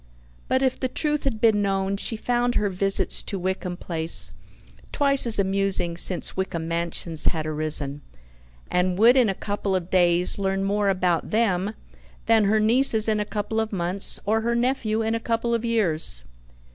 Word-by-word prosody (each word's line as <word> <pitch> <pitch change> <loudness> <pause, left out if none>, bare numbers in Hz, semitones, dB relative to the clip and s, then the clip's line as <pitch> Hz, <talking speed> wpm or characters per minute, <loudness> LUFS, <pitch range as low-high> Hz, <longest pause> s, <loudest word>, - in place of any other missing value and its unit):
But 260 +1 0
if 260 -1 -1
the 260 - -1
truth 300 +3 -3
had 235 -6 -2
been 215 -2 +2
known, 195 0 -1
she 220 +3 -2
found 245 +1 -1
her 210 -1 0
visits 195 0 +1
to 200 - -5
Wickham 185 -1 -4
Place 165 -2 0 0.6
twice 275 -3 +2
as 225 - +2
amusing 195 -3 0
since 175 +1 +3
Wickham 170 -4 -4
Mansions 170 -1 -2
had 160 -3 -1
arisen, 150 -2 +1 0.7
and 180 0 0
would 235 +5 +5
in 250 -5 +3
a 195 - -2
couple 200 -1 -3
of 180 -1 -4
days 175 0 +2
learn 195 0 -2
more 200 +1 0
about 180 -3 -1
them 210 -2 -1 0.5
than 225 -2 +3
her 215 +2 +2
nieces 225 0 +4
in 215 -1 0
a 210 - -2
couple 215 +1 -4
of 220 -1 -3
months, 185 0 0
or 220 +2 0
her 235 +1 -1
nephew 235 -3 -1
in 220 0 -1
a 230 - -2
couple 230 0 -2
of 230 -1 -1
years. 170 - +1
200 Hz, 175 wpm, -23 LUFS, 180-225 Hz, 0.7 s, would